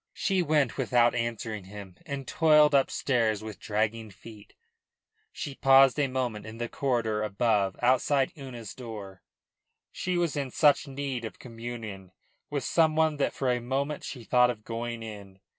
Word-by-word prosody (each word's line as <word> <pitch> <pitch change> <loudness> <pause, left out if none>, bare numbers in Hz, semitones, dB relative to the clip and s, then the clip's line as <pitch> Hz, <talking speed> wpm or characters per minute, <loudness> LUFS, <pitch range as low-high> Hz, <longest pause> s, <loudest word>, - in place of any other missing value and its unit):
She 190 -2 0
went 150 -6 +1
without 120 -1 +3
answering 115 -3 -3
him 100 -2 -10
and 140 -3 -5
toiled 150 -2 +5
upstairs 120 -5 +1
with 110 -2 -8
dragging 110 +1 -1
feet. 105 +2 -14 0.8
She 140 - -6
paused 135 +1 +5
a 140 - +2
moment 125 -5 -3
in 110 +1 -9
the 120 0 -3
corridor 115 -5 -1
above, 105 -2 +1
outside 130 +2 +3
Una's 125 -7 -8
door. 105 -6 -9 0.7
She 180 -1 -2
was 170 -4 0
in 140 -2 -2
such 145 +2 +3
need 135 -3 -4
of 110 - -7
communion 115 -6 -8 0.4
with 145 -3 -2
some 160 +1 +2
one 160 -1 +2
that 140 - +1
for 130 -2 0
a 125 0 -1
moment 140 +4 -2
she 125 -4 -7
thought 125 +2 +4
of 110 -3 -5
going 115 0 -5
in. 100 -3 -10
120 Hz, 160 wpm, -28 LUFS, 110-140 Hz, 0.8 s, toiled